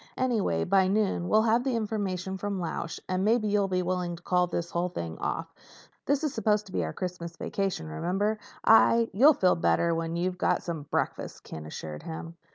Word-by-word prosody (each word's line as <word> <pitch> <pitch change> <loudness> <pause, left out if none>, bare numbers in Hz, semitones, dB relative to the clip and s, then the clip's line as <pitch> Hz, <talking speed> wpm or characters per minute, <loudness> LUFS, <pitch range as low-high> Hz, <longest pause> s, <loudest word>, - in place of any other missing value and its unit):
"Anyway, 220 - +1
by 190 0 +3
noon 195 -3 +1
we'll 215 0 +5
have 230 +2 +3
the 260 -2 0
information 200 -4 -2
from 200 0 -3
Lausch 165 -1 -4
and 185 0 0
maybe 220 +1 +2
you'll 205 -1 +2
be 185 -1 0
willing 180 -1 -1
to 170 - -15
call 180 -1 +2
this 170 0 -3
whole 175 +1 0
thing 85 - -5
off. - - -3 0.5
This 285 +2 +1
is 300 - 0
supposed 210 -1 +1
to 190 - -13
be 90 - 0
our 80 - -3
Christmas 170 - -5
vacation, 195 - -2
remember? 190 - -1 0.3
I—" 230 +1 +6
"You'll 275 +8 +6
feel 185 -1 +4
better 170 0 +2
when 165 0 -2
you've 180 +1 -2
had - - +2
some 160 -4 -5
breakfast," - - -2
Ken 75 -1 -8
assured 75 0 -7
him. 165 +1 -7
185 Hz, 195 wpm, -28 LUFS, 170-215 Hz, 0.5 s, I